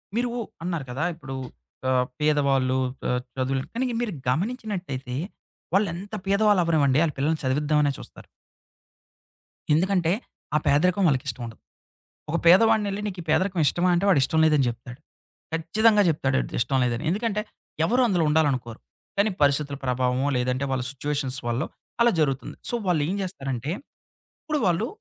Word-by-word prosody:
మీరు 240 +1 +1 0.3
అన్నారు 170 -5 -2
కదా! 135 +5 -2
ఇప్పుడు 135 -4 -8 0.5
ఆహ్, 125 -1 +3 0.2
పేదవాళ్ళు 140 -4 +2 0.3
ఆహ్, 125 0 0 0.2
చదువులు 130 0 0
కానీ 255 +3 0 0.2
మీరు 230 -5 -2 0.2
గమనించినట్టయితే, 180 - -3 0.6
వాళ్లెంత 200 +1 -1
పేదవాళ్ళవ్వనివ్వండి 170 -9 +3
ఆళ్ళ 155 - -2
పిల్లల్ని 155 +4 0
చదివిద్దామనే 145 +2 +2
చూస్తారు. - - -13 1.5
ఎందుకంటే 175 +1 +2 0.4
ఆ - - +6
పేదరికం 180 +7 +3
వాళ్ళకిష్టం 130 -4 -1
ఉండదు. 115 -1 -10 0.7
ఒక 165 - +1
పేదవాడినెళ్ళి 205 +2 +5
నీకీ 185 -3 -5
పేదరికం 185 +3 +2
ఇష్టమా? 175 +6 +2
అంటే 175 +3 +1
వాడిష్టం 160 -2 +3
లేదని 150 -4 +4
చెప్తాడు. 120 +2 -9 0.5
ఖచ్చితంగా 210 +7 +3
చెప్తాడు 135 -4 +1 0.2
ఇష్టం 135 +3 +1
లేదని. 120 +2 -1
ఎందుకంటే 210 +3 0 0.4
ఎవరు 245 +9 +2
అందులో 180 -6 +2
ఉండాలనుకోరు. 135 -7 +1 0.4
కానీ 200 +2 +3
పరిస్థితుల 140 0 +2
ప్రభావమో 125 +1 +1
లేదంటే, 125 +2 0
వాళ్ళ 130 -1 0
సిట్యుయేషన్స్ 140 -1 -2
వల్లో 120 +2 0 0.4
అలా 235 0 +6
జరుగుతుంది. 135 -3 -1
సో, - - 0
వాళ్లెం 170 +1 +1
చేస్తారంటే, 135 -7 -4 0.7
ఇప్పుడు 305 -2 -1
వాళ్ళు 180 +5 +1
150 Hz, 125 wpm, -25 LUFS, 130-190 Hz, 1.5 s, ఆ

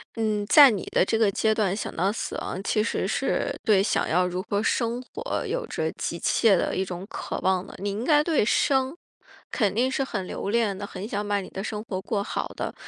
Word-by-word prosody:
嗯， 215 -2 0
在 280 +6 +9
你 205 -6 -2
的 - - +4
这 225 - 0
个 220 -3 +3
阶 220 +2 +2
段 200 -4 +1
想 210 - -5
到 190 +4 +1
死 225 - -4
亡， 185 - -4
其 215 +1 +1
实 230 - -1
是 - - 0
对 210 -5 +4
想 200 - +1
要 180 +2 +2
如 180 +1 -3
何 205 0 -1
生 235 +1 0
活 460 - -4
有 - - -2
着 - - -2
急 - - -4
切 220 -4 +3
的 - - 0
一 190 - 0
种 180 0 -6
渴 - - -5
望 185 0 +1
的。 - - -12
你 200 +2 -2
应 205 +3 -3
该 295 0 +4
对 315 -10 +2
生， 265 +4 +2 0.5
肯 205 -6 +1
定 245 +4 +2
是 270 - 0
很 205 -8 -4
留 200 - -4
恋 220 -4 +1
的， 205 - -5
很 200 0 -7
想 205 -2 -3
把 205 -1 0
你 185 - -9
的 195 - -6
生 210 0 -4
活 185 -4 -4
过 200 +1 -2
好 - - -3
的。 - - -4
210 Hz, 250 characters per minute, -25 LUFS, 195-235 Hz, 0.5 s, 在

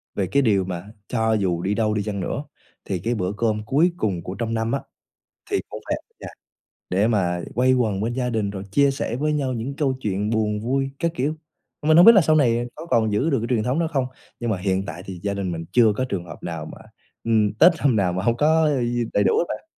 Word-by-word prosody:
về 95 -2 0
cái 140 +10 +2
điều 105 -7 +2
mà 90 -1 -5 0.2
cho 110 -2 +1
dù 95 -5 0
đi 95 +3 0
đâu 110 0 +1
đi 105 -1 -1
chăng 100 -1 -3
nữa, 115 +9 -3 0.4
thì 95 -2 -2
cái 115 +7 -1
bữa 90 -4 -1
cơm 110 -2 0
cuối 150 +10 +3
cùng 95 - -1
của 95 - -6
trong 115 +2 -3
năm 115 0 -1
á, 140 - -1 0.7
thì - - +1
cũng - - -7
phải - - -1
ở - - -14
nhà - - -8 0.6
để 100 +4 +2
mà 90 -6 +1
quây 130 +2 +3
quần 110 -6 0
bên 115 +3 -1
gia 125 0 -1
đình, 110 -3 -1
rồi 100 -1 -6
chia 140 +6 +4
sẻ 130 -3 -3
với 150 +3 0
nhau 140 -3 -1
những 125 +3 -4
câu 140 -3 +1
chuyện 105 -2 -1
buồn 105 -2 0
vui 135 +4 -1
các 170 -1 0
kiểu. 150 0 -1 0.5
Mình 155 +1 +4
hông 175 - +8
biết 230 - +10
là 200 - +7
sau 155 -2 +3
này 120 -4 +2
có - - -9
còn 110 -8 +2
giữ 130 +11 +1
được 135 - +2
cái 115 - -3
truyền 110 - 0
thống 125 +6 0
đó 170 - +1
không, 135 -3 +1 0.3
nhưng 120 -1 -1
mà 105 - +1
hiện 95 +1 -1
tại 90 - -7
thì 95 -2 -7
gia 100 -1 -1
đình 95 -3 -3
mình 85 0 -5
chưa 115 -3 +5
có 130 - 0
trường 95 -6 -3
hợp 75 -3 -11
nào 85 -2 -5
mà, - - -10 0.5
ừm, 110 -3 +2
Tết 175 +11 +6
năm 135 -6 +2
nào 95 -4 +2
mà 90 +1 -2
hông 115 +1 +2
có 155 +3 +3
d 120 -4 0
đầy 100 - +2
đủ - - +3
hết - - +2
bạn. - - -5
110 Hz, 260 wpm, -23 LUFS, 100-130 Hz, 0.7 s, biết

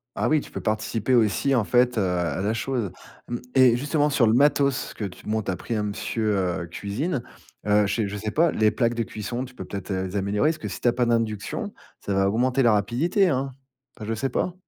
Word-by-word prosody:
Ah - - 0
oui, 155 -2 +3
tu - - -13
peux - - -5
participer 110 +3 -1
aussi, 120 +4 +3
en 120 - +3
fait, 125 +2 +2
heu, - - +3
à 90 -3 -1
la 105 +3 0
chose. 115 -3 -2 0.4
Mmh 120 - -2 0.2
et 130 -3 +6
justement, 145 +3 +1
sur 135 -5 +3
le 110 - +4
matos 140 +1 +2
que 105 - -4
tu 95 - -9
m - - -3
bon 110 0 +1
tu 100 - -6
as - - -2
pris 115 - -5
un 105 -2 0
monsieur, 105 +1 -1 0.3
heu, - - -8
cuisine, 120 - -3 0.4
heu, 105 0 +4
chez 105 +1 -1
je 105 - -5
sais 105 +1 -3
pas, 165 +4 +3
les 110 -1 +3
plaques 115 +2 +1
de 115 -1 -1
cuisson, 120 +4 -4
tu 125 -1 -15
peux - - -6
peut-être 100 -1 -7
les 95 +1 -2
améliorer? 100 +8 +1
Parce 160 - -2
que 155 - -6
si - - -6
tu - - +1
as - - +3
pas 125 0 +1
d'induction, 115 -3 -1 0.3
ça 100 - -3
va 95 0 +2
augmenter 125 +5 +1
la 115 -3 +5
rapidité, 150 - +2
hein? 135 -2 -1 0.4
Enfin 110 - -8
je 110 - -2
sais 115 +5 -1
pas, 175 +7 -1
115 Hz, 245 wpm, -25 LUFS, 105-130 Hz, 0.4 s, et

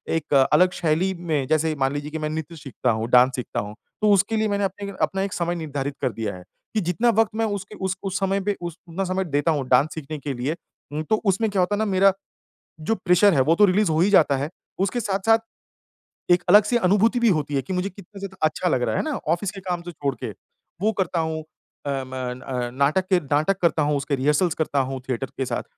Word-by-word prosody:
एक 155 -2 -2 0.2
अलग 180 +4 +5
शैली 170 +4 +1
में 160 -6 -2
जैसे 155 0 +1
मान 135 +1 +1
लीजिए 145 +1 -4
कि 160 - -3
मैं 155 0 -2
नृत्य 160 +1 -5
सीखता 135 -4 -2
हूँ, 110 +1 -2
डांस 125 +1 +5
सीखता 125 - -3
हूँ। 105 +1 -6 0.3
तो 210 -1 +4
उसके 200 +3 +2
लिए 215 0 +1
मैंने 200 -1 0
अपने 200 +1 -3
अपना 195 0 +1
एक 195 -1 -2
समय 175 0 -1
निर्धारित 145 -4 -4
कर 125 - +1
दिया 105 -4 -4
है 90 - -11 0.3
कि 215 - +1
जितना 180 +8 +1
वक़्त 225 -1 +3
मैं 225 0 +1
उसके 205 0 -4
उस 190 +1 -1
उस 195 0 -2
समय 195 0 +1
पे 205 +1 -1
उस 170 -1 -5
उतना 180 +4 -3
समय 185 +1 -1
देता 145 +1 +1
हूँ, 140 -4 -1
डांस 135 +5 +4
सीखने 155 -1 -6
के 140 0 -4
लिए 130 +6 -2 0.4
उ - - -2
तो 215 - +4
उसमें 200 +3 +2
क्या 195 - 0
होता 180 +3 +2
है - - -3
ना 220 - +1
मेरा 195 0 +4 0.7
जो 225 +9 0
प्रेशर 180 0 +4
है 135 - +3
वो 160 +5 +3
तो 210 - +6
रिलीज 200 +1 +3
हो 155 +1 +2
ही 190 - +4
जाता 150 -8 +5
है। 140 +3 -2 0.3
उसके 200 +5 0
साथ-साथ 205 +2 +2 0.9
एक 175 0 +5
अलग-सी 210 +5 +6
अनुभूति 220 +4 +3
भी 235 - +4
होती 150 -5 0
है 135 - +1
कि 190 - -6
मुझे 180 +2 -1
कितना 200 +1 -13
ज़्यादा 195 -1 -7
अच्छा 180 +3 -1
लग 125 -6 +1
रहा - - 0
है - - +1
है - - -1
ना 285 - -2 0.2
ऑफिस 185 +3 -1
के 195 -1 -9
काम 180 -2 -3
तो 175 - -7
छोड़ 140 -3 -2
के 115 - -3 0.5
वो 215 +2 +2
करता 180 -2 0
हूँ 160 0 -2 0.4
अ, - - 0
म 130 - -13
अ, 125 -1 -4
नाटक 150 +9 0
ए 180 - +5
नाटक 155 +6 +1
करता 165 -2 +3
हूँ, 145 0 +1
उसके 140 +1 -1
रिहर्सल्स 150 +5 +2
करता 150 -3 -1
हूँ, 130 0 -2
थिएटर 130 +1 -2
के 135 - 0
साथ। 120 - -2
170 Hz, 245 wpm, -23 LUFS, 145-195 Hz, 0.9 s, तो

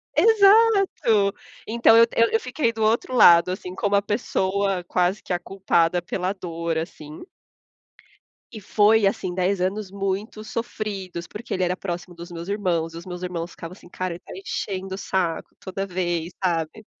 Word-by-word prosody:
Exato, 395 - +4 0.3
então 225 0 +5
eu 230 - +8
eu 230 0 +4
eu 225 - +2
fiquei 255 0 -1
do 220 - -6
outro 225 +4 +1
lado, 175 -5 +7
assim 185 0 -6
como 200 +1 0
a 200 - +4
pessoa 200 -3 -1
quase 180 +3 0
que - - -9
a 175 - 0
culpada 175 -2 +1
pela 185 +2 -2
dor 170 -3 -4
assim. 155 -2 -7 1.3
E 215 - -9
foi 210 +1 +4
assim 195 -2 -1
10 185 +1 0
anos 190 +2 -2
muito 200 +2 -3
sofridos, 205 -6 -5
porque 220 +7 -7
ele 185 - 0
era 180 0 0
próximo 175 -1 -6
dos 170 +1 -10
meus 170 0 -7
irmãos 175 -5 -1
e - - -8
os 170 - -9
meus 180 -1 -7
irmãos 175 -1 -4
ficavam 165 +1 -9
assim: 185 - -16
"Cara, 185 0 -4
ele 170 - -9
tá - - -15
enchendo 195 - -4
o - - -8
saco 180 -4 -2
toda 195 +1 -4
vez", 175 -2 -2
sabe? 175 +3 -2
190 Hz, 175 wpm, -23 LUFS, 175-215 Hz, 1.3 s, eu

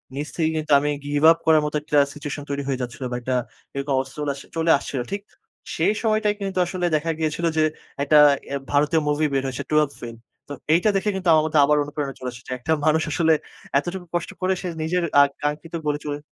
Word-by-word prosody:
নিজ 145 +2 -3
থেকেই 160 -2 +1
কিন্তু 155 -1 -4
আমি 150 +1 -1 0.2
গিভ 145 +1 -1
আপ 165 - +2
করার 160 -1 +5
মত 150 - -3
একটা 150 -1 +2
সিচুয়েশন 145 -1 -6
তৈরি 140 0 -2
হয়ে 130 -2 -1
যাচ্ছিল 125 +2 -6
বা 120 - -2
একটা 130 +1 -1 0.4
এরকম 140 0 -2
অবস্থা 130 0 -2
চলে 150 -1 -1
আস 140 - -11 0.2
চলে 165 0 +3
আসছিল। 135 -1 -5
ঠিক 200 0 -2 0.5
সেই 210 - +2
সময়টাই 215 -2 +2
কিন্তু 195 -2 -2
আসলে 180 0 -3
দেখা 165 +2 0
গিয়েছিল 160 +2 -1
যে, 155 - +4 0.4
একটা 150 +1 +4 0.3
এ্যা 140 - -2
ভারতীয় 150 +3 +3
মুভি 150 +1 +1
বের 135 -1 +1
হয়েছে, 130 -1 -4
"12th 150 -2 +2
Fail" 115 -1 -7 0.3
তো 145 - -6 0.2
এইটা 175 +6 +3
দেখে 200 +2 +1
কিন্তু 190 -2 -4
আমার 155 -1 +4
মধ্যে 155 -1 +2
আবার 150 +1 +3
অনুপ্রেরণা 145 -1 -4
চলে 130 -1 -4
এসেছে। 120 +1 -11
একটা 160 - -3
মানুষ 160 +1 +3
আসলে 165 -2 +3 0.4
এতটুকু 175 +4 -3
কষ্ট 175 - -1
করে, 185 +1 +2
সে 185 - -4 0.2
নিজের 175 +3 0 0.2
আ - - +10
আকাঙ্ক্ষিত 150 +3 -4
গোলে 145 0 0
চলে 145 -1 -3
150 Hz, 215 wpm, -23 LUFS, 140-165 Hz, 0.5 s, আ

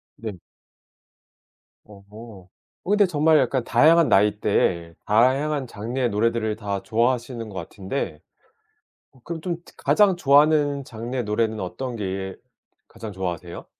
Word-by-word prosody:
네. 110 -2 -6 1.5
어. 100 -2 -15 0.8
어 - - -6
근데 205 0 +5
정말 160 -2 +3
약간 130 -1 0
다양한 165 +5 +4
나이대에 100 -4 +2
다양한 130 +6 +2
장르의 120 +4 -3
노래들을 110 0 0
다 100 -3 -3
좋아하시는 120 0 -1
것 - - -11
같은데 95 - -5 0.9
어 130 - -23
그럼 170 -1 -5
좀 175 -1 -2
특 - - -19
가장 185 +7 +3
좋아하는 145 -2 +3
장르의 120 +1 -5
노래는 110 +1 -1
어떤 120 +7 -5
게 95 -2 -4 0.5
가장 110 -2 -9
좋아하세요? 90 -2 -5
115 Hz, 275 characters per minute, -23 LUFS, 105-145 Hz, 1.5 s, 근데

